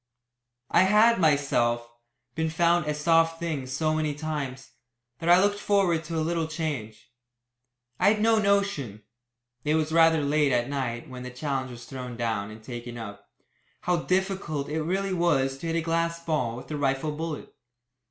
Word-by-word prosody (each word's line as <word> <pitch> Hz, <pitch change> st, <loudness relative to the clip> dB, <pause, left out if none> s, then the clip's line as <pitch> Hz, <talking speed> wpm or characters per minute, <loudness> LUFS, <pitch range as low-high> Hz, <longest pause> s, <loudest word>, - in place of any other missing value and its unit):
I -, -, +5 dB
had, 215 Hz, +3 st, +5 dB
myself, 135 Hz, -7 st, +2 dB, 0.5 s
been 160 Hz, +3 st, -1 dB
found 170 Hz, 0 st, +2 dB
a 150 Hz, -, +1 dB
"soft 165 Hz, +1 st, +3 dB
thing" 155 Hz, -6 st, -3 dB
so 155 Hz, +5 st, 0 dB
many 155 Hz, -2 st, -1 dB
times, 145 Hz, -4 st, -5 dB, 0.5 s
that 165 Hz, -, -2 dB
I 175 Hz, +1 st, +8 dB
looked 205 Hz, +1 st, +2 dB
forward 190 Hz, -6 st, +2 dB
to 165 Hz, -, -5 dB
a 160 Hz, -, 0 dB
little 165 Hz, -1 st, -1 dB
change. 150 Hz, -10 st, -5 dB, 0.9 s
I -, -, +4 dB
had 215 Hz, -, -3 dB
no 225 Hz, +1 st, +4 dB
notion 195 Hz, -, 0 dB, 0.6 s
(it 150 Hz, +1 st, +1 dB
was 155 Hz, 0 st, 0 dB
rather 165 Hz, -1 st, +5 dB
late 145 Hz, 0 st, +2 dB
at 120 Hz, -1 st, +1 dB
night 125 Hz, -4 st, -3 dB
when 125 Hz, -1 st, -8 dB
the 125 Hz, -, -6 dB
challenge 130 Hz, 0 st, -3 dB
was 120 Hz, -1 st, -10 dB
thrown 125 Hz, -2 st, -7 dB
down, 110 Hz, -4 st, -2 dB
and 110 Hz, +1 st, -11 dB
taken 120 Hz, 0 st, -7 dB
up) 100 Hz, -3 st, -9 dB, 0.5 s
how 180 Hz, -1 st, +1 dB
difficult 185 Hz, -5 st, -1 dB
it 160 Hz, +1 st, -1 dB
really 190 Hz, +4 st, -1 dB
was 135 Hz, -7 st, +1 dB
to 165 Hz, -, -5 dB
hit 165 Hz, -, -1 dB
a 165 Hz, -, +1 dB
glass 165 Hz, +1 st, -1 dB
ball 130 Hz, -8 st, -1 dB
with 125 Hz, -, -10 dB
a 150 Hz, -, -2 dB
rifle 135 Hz, +1 st, 0 dB
bullet. 155 Hz, 0 st, -5 dB
155 Hz, 170 wpm, -27 LUFS, 130-170 Hz, 0.9 s, I